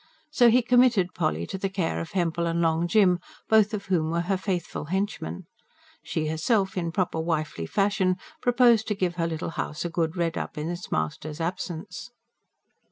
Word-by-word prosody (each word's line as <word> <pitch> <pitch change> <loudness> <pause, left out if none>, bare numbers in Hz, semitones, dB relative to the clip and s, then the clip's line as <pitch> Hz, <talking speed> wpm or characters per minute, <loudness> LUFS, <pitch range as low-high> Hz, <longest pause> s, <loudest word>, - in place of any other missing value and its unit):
So 245 -5 +6
he 245 +2 +4
committed 240 -7 +4
Polly 80 +2 -1
to 190 - -6
the 195 - -1
care 185 -4 -1
of 165 - -8
Hempel 170 -2 0
and 165 0 0
Long 165 0 +2
Jim, 180 -3 +4 0.3
both 215 -1 +4
of 210 -2 -4
whom 165 -4 +1
were 170 +1 0
her 190 +3 0
faithful 185 -5 -3
henchmen. 185 - -3 0.6
She 155 - -2
herself, 190 +6 +1
in 170 -3 -2
proper 170 -2 -1
wifely 155 - -2
fashion, 195 - +1 0.3
proposed 240 -3 +4
to 210 - 0
give 180 -2 -1
her 165 -1 +1
little 160 0 -4
house 150 - -5
a 170 - -3
good 165 0 -1
red 170 -1 0
up - - -6
in 155 +3 -2
its 175 +1 -7
master's 145 - -3
absence. 175 +3 -4
175 Hz, 180 wpm, -26 LUFS, 160-200 Hz, 0.6 s, So